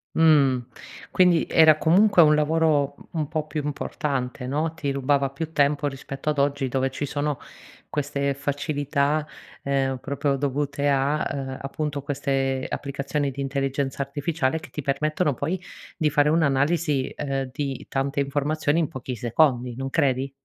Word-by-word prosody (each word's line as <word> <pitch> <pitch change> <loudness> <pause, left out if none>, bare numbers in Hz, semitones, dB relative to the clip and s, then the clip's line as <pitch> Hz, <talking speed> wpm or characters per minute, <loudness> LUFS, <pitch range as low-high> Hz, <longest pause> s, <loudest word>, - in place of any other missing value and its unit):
Mh, 150 -5 +5 0.5
quindi 180 -3 +4
era 160 -2 +6
comunque 185 +4 +5
un 150 - +5
lavoro 150 -1 +2
u - - -17
un 150 - 0
po' 155 0 -2
più 155 -1 -4
importante 135 -3 -3
no, 155 +4 -1
ti 145 -4 -3
rubava 140 0 +1
più 155 +4 -5
tempo, 145 -1 +2
rispetto 135 +1 -5
ad 150 - -2
oggi, 140 -1 +1
dove 135 +1 0
ci 140 +2 -4
sono 145 0 -2 0.5
queste 140 -1 -1
facilità, 145 +1 -1 0.4
ehm, 135 -1 0
proprio 140 +1 -1
dovute 145 +1 -1
a, 140 +2 +1
ehm, 135 -1 -4
appunto 145 +1 -3
queste 135 -1 -1
applicazioni 140 0 -2
di 140 - -6
intelligenza 135 0 -2
artificiale 145 +1 -1
che - - -12
ti 150 - -5
permettono 150 +3 0
poi 165 +8 -3 0.3
di 155 -3 +1
fare 145 0 +3
un'analisi, 150 -1 +2
ehm, 135 -2 -2
di 135 -3 -4
tante 140 +1 -1
informazioni 145 +2 0
in 160 - +1
pochi 130 -1 -6
secondi. 120 +1 +1
Non 135 +2 -4
credi? 135 -2 +1
140 Hz, 150 wpm, -24 LUFS, 135-150 Hz, 0.5 s, era